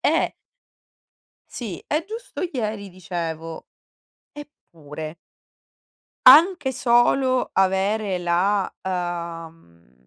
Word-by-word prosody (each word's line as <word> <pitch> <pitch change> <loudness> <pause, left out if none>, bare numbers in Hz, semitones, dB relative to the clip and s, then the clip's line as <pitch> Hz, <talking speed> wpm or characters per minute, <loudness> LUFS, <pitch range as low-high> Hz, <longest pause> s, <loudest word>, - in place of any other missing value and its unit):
Eh - - +1 1.2
Sì, 215 -8 -6
e 305 +2 0
giusto 450 +4 -7
ieri 215 -6 -4
dicevo: 165 -3 -6 0.7
"Eppure" 160 - -10 1.1
anche 300 +1 +7
solo 255 +1 +2
avere 195 +1 +1
la, 180 +3 0
ehm, 165 - -6
190 Hz, 70 wpm, -23 LUFS, 170-250 Hz, 1.2 s, anche